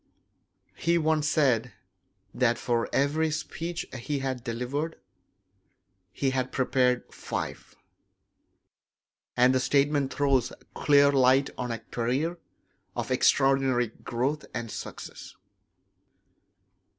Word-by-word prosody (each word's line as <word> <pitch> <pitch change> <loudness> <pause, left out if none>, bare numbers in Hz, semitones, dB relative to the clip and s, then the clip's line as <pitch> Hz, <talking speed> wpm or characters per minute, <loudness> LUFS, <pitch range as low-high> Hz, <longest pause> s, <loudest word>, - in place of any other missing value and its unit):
He 170 +1 +2
once 155 -2 +1
said 125 -7 +2 0.6
that 120 -2 +2
for 120 -1 -1
every 150 +3 +1
speech 165 +2 -4
he 135 +3 -3
had 130 -3 -3
delivered 130 +7 -3 1.2
he 135 +6 -1
had 130 -1 -1
prepared 125 -1 +1
five; - - -5 1.6
and 125 +1 +5
the 130 - +3
statement 140 +1 +2
throws 135 -4 +1 0.2
clear 140 -1 +5
light 135 0 +4
on 125 -1 -4
a 115 - -2
career 130 +11 -2 0.6
of - - -3
extraordinary 135 -3 +3
growth 130 +6 -3
and 115 -2 -4
success. - - -8
135 Hz, 100 wpm, -27 LUFS, 125-145 Hz, 1.6 s, and